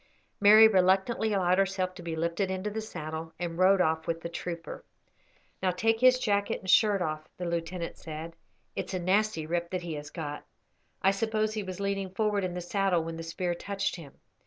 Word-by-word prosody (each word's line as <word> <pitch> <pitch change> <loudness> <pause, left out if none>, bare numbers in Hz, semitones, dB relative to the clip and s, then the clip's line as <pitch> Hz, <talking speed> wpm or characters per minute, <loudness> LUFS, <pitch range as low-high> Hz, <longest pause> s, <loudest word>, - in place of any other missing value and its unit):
Mary 215 +2 +9
reluctantly 195 +3 +2
allowed 185 -2 +2
herself 190 -1 0
to 180 - -10
be 170 -1 -4
lifted 170 +4 -1
into 190 +2 -3
the 220 +1 -3
saddle, 160 -5 -6
and 170 0 -4
rode 190 +1 +5
off 160 -1 0
with 165 0 -2
the 170 - -5
trooper. 170 -1 -6 0.8
"Now 185 - +2
take 225 +5 +1
his 255 +1 +6
jacket 205 -4 0
and 190 - -12
shirt 200 0 +4
off," 155 -1 -4
the 180 - -4
lieutenant 170 0 -3
said, 160 +1 -7 0.4
"it's - - -3
a - - -1
nasty 190 -2 +1
rip 170 +1 -2
that 185 -1 -3
he 170 -2 -4
has 145 -1 -6
got. 150 -3 -6 0.6
I 195 - +5
suppose 215 +1 0
he 215 - -2
was 185 -2 -6
leaning 200 -1 -2
forward 205 +1 0
in 180 -1 -3
the 180 - -3
saddle 185 -1 +1
when 165 0 -5
the - - -5
spear 175 +2 -2
touched 195 +2 -3
him. 150 -6 -11
185 Hz, 200 wpm, -29 LUFS, 170-200 Hz, 0.8 s, Mary